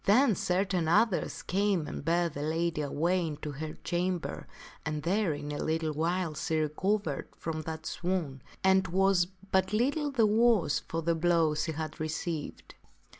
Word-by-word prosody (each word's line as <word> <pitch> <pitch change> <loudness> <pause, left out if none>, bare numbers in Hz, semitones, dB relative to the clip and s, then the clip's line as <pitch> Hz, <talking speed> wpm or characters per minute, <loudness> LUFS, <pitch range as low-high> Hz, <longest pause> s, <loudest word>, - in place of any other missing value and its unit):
Then 235 +4 +5
certain 180 -2 0
others 185 +4 +2
came 195 -3 +1
and - - -6
bare 170 +2 +2
the 145 -3 -6
lady 160 +1 0
away 165 +5 0
into 150 -1 -5
her 155 +2 -6
cham 180 +1 0
ber, 170 - -7 0.4
and 150 0 -3
there 190 +1 +1
in 145 0 -6
a 145 - -4
little 160 0 0
while 165 +2 0
she 160 +1 -1
recovered 155 +1 -1
from 155 -1 -3
that 160 -1 -6
swoon 170 -8 -2 0.2
and 190 0 +4
was 190 0 +3 0.2
but 190 +1 +2
little 285 +7 +1
the 250 -5 +3
worse 215 -7 +3
for 165 0 -4
the 170 +1 +2
blow 165 -1 +3
she 155 +1 -1
had 155 0 -5
received. 155 0 -4
170 Hz, 165 wpm, -30 LUFS, 155-190 Hz, 0.4 s, Then